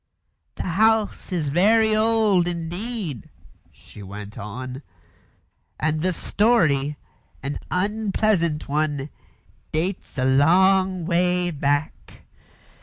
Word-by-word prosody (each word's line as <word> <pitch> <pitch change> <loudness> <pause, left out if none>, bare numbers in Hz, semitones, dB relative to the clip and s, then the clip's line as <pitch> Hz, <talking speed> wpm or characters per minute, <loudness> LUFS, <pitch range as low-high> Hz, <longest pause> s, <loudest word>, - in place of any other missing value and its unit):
"The - - -4
house 215 +4 +1
is 165 -5 -1
very 215 +7 +3
old 215 -5 +3
indeed," 175 - -4 0.4
she 105 - -15
went 100 +2 -9
on, 125 +6 -7 1.0
"and 155 0 0
the 185 +2 +1
story 160 - +1 0.5
an 140 +1 -3
unpleasant 200 -4 0
one 145 -1 -1 0.6
dates 175 +1 -3
a 130 - +1
long 185 +6 +3
way 180 0 +1
back. 145 0 -2
175 Hz, 95 wpm, -23 LUFS, 145-200 Hz, 1.0 s, very